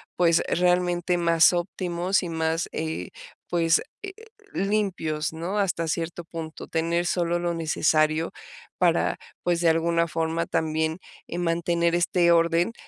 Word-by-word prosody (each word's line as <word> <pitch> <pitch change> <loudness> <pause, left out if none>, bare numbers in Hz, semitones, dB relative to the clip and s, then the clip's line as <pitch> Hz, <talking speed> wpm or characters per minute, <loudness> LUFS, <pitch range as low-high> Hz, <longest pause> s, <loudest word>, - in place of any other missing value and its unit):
pues, 170 -2 +3
realmente 180 0 +1
más 170 -1 +5
óptimos 180 +1 -1
y 175 - -4
más, 160 +1 -1
eh, 160 - -4 0.4
pues, 165 -1 +3 0.2
eh, 390 -1 -6 0.4
limpios, 185 -7 -1
¿no?, 170 +6 -3
hasta 170 -4 0
cierto 165 +1 -3
punto, 160 -1 -7
tener 170 +1 0
solo 175 -1 0
lo 175 0 -1
necesario 155 0 +1 0.5
para, - - +2 0.3
pues, 175 -1 +1
de 170 - +4
alguna 170 +1 +2
forma 165 +1 -1
también, 160 +1 -1 0.3
eh, 170 - -5
mantener 170 0 +1
este 175 0 +3
orden, 170 +5 +3
170 Hz, 130 wpm, -25 LUFS, 165-175 Hz, 0.5 s, más